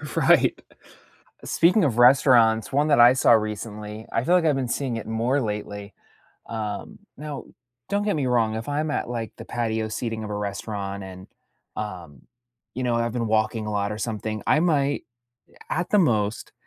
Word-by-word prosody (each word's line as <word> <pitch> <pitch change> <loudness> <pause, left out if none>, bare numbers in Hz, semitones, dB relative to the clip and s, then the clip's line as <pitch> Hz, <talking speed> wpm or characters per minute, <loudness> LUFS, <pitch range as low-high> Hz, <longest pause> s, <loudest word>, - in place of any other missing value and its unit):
Right, - - +4 0.9
speaking 180 +4 +3
of 120 -5 0
restaurants, 120 -3 +5
one 145 +3 +2
that 145 - +4
I 120 +1 +9
saw 130 - +4
recently, 105 0 -2
I 115 - 0
feel 175 - +3
like, 180 -2 +3
I've 150 -3 +3
been 130 -2 -2
seeing 125 -1 -2
it 115 - -6
more 115 +5 0
lately 105 -2 -5 0.6
um, 105 -3 -5 0.2
now, 150 -2 -7 0.4
don't 200 +1 0
get 205 -1 0
me 145 -3 -1
wrong, 115 -3 +1
if 110 +1 -5
I'm 150 +1 -1
at, 145 - -2
like, 115 -2 -4
the - - -9
patio 110 -2 -2
seating 110 0 -4
of 105 - -6
a 105 - -3
restaurant 100 -1 -4
and, 95 0 -10 0.5
um, 90 - -7 0.5
you 130 - -4
know, 120 -1 +1
I've 115 0 -1
been 120 -2 -1
walking 110 0 0
a 105 - -3
lot 100 0 -1
or 105 - -4
something, 110 -1 -4
I 150 - +4
might, 145 -4 +1 0.7
at 175 +2 -2
the 210 - +5
most, 110 - 0
115 Hz, 180 wpm, -24 LUFS, 105-135 Hz, 0.9 s, I